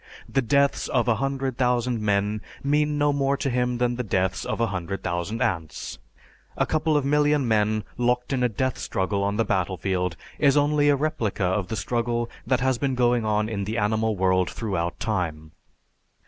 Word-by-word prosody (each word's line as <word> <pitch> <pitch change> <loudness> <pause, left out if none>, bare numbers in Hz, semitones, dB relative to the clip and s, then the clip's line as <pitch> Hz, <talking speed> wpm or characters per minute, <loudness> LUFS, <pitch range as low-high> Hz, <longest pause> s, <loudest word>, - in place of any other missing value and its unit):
The 135 - +1
deaths 140 +3 +2
of 125 -5 +1
a 115 -2 +3
hundred 135 0 -2
thousand 125 -2 +1
men 105 0 0 0.2
mean 150 +1 +1
no 145 0 +2
more 140 0 +1
to 135 -1 -1
him 125 0 0
than 120 0 0
the 125 - -1
deaths 95 -3 0
of - - -3
a 115 - +3
hundred 95 -2 -4
thousand 95 +7 -2
ants. 80 -4 -3 0.6
A - - +2
couple 155 -1 +1
of 145 - 0
million 145 -1 +2
men 110 -1 +2 0.2
locked 125 +2 +1
in 130 - 0
a 125 - +3
death 130 +4 -2
struggle 100 +1 -1
on 100 +1 0
the 115 - +2
battlefield 90 -2 -1 0.2
is 145 -1 +4
only 145 0 +3
a 145 - +5
replica 125 -10 -1
of 95 +1 0
the 110 - -3
struggle 120 +3 -1 0.2
that 130 -2 +2
has 130 -2 +1
been 135 -2 0
going 120 -2 +2
on 105 0 +1
in 100 -3 -3
the 110 +3 -3
animal 110 0 +1
world 95 -1 +2
throughout 95 -6 -3
time. 80 -7 -2
115 Hz, 190 wpm, -25 LUFS, 100-135 Hz, 0.6 s, a